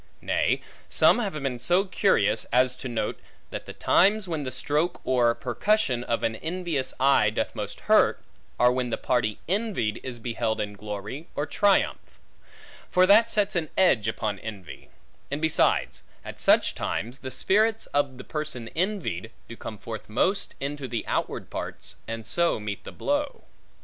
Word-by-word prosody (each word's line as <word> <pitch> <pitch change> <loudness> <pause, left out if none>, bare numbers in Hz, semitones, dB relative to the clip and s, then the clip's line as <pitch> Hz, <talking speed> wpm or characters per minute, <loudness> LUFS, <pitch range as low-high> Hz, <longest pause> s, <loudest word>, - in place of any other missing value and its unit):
Nay, - - 0 0.3
some - - +6
have 205 -6 -2
been 135 -5 -3
so 175 +10 +2
curious, 115 - +2
as 125 +1 +3
to - - -6
note, 110 -3 -2 0.3
that - - -6
the - - -7
times 200 +2 +3
when 160 -3 -2
the 135 - -3
stroke 150 +7 -1
or 120 -2 +3
percussion 130 - 0
of 115 -1 -1
an 110 0 0
envious 165 -4 -2
eye 135 -5 +5
doth 105 - -2
most - - -6
hurt, - - +4 0.4
are 125 0 +6
when 125 -1 -1
the - - -1
party 110 -4 0
envied 190 - -1
is 125 -2 -6
beheld 115 -1 -2
in 105 0 -3
glory 105 - -6
or 145 - -1
triumph; 200 +4 +1 0.7
for 185 0 +5
that 220 +4 +6
sets 210 -1 +1
an 160 -3 0
edge 130 - +4
upon 110 -2 -2
envy: 105 -5 -9 0.4
and 145 - -2
besides, 160 0 +2 0.2
at - - -8
such - - +4
times 120 +6 -3
the 130 - -6
spirits 220 +9 +2
of 140 -3 +1
the 130 - -8
person 150 -7 -5
envied, 170 - -2 0.2
do 115 - -8
come 110 - -7
forth 110 +2 -8
most 185 - 0
into 140 0 -4
the 120 -2 -3
outward - - -2
parts, - - -6
and 115 -1 -5
so 170 -8 +1
meet 105 -1 -5
the - - -7
blow. 290 0 -2
130 Hz, 165 wpm, -26 LUFS, 115-180 Hz, 0.7 s, some